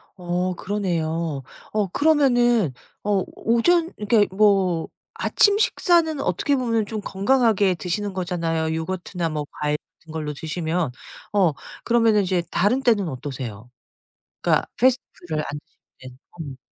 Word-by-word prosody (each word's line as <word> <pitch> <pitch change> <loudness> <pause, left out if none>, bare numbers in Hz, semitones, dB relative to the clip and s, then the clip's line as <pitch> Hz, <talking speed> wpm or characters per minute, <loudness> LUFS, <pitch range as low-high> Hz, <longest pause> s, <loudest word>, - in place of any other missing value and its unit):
어 180 0 -1
그러네요. 165 -7 -2 0.3
어 210 -2 0
그러면은 245 - +3 0.3
어 200 -2 +1
오전 330 +10 +2
그러니까 210 -2 +2
뭐 195 -5 +3 0.3
아침 410 -1 +3
식사는 340 -7 +2
어떻게 275 - +1
보면 230 -4 0
좀 215 0 -5
건강하게 205 -2 +2
드시는 190 +3 -3
거잖아요 165 -3 -1
요거트나 175 +1 -3
뭐 150 -1 -3
과일 150 0 0 0.2
같은 160 - -15
걸로 155 -2 -3
드시면. 160 0 -2 0.4
어 185 -7 +3 0.3
그러면은 230 -3 +3
이제 185 -2 0
다른 240 +9 +2
때는 215 -7 +3
어떠세요? 125 -4 -7 0.7
그러니까 - - +2
패스트푸드를 180 -11 0
안 145 - -5
드실 - - -41 0.2
때는. 130 -1 -12 0.4
어. - - -15
190 Hz, 305 characters per minute, -23 LUFS, 160-230 Hz, 0.7 s, 그러면은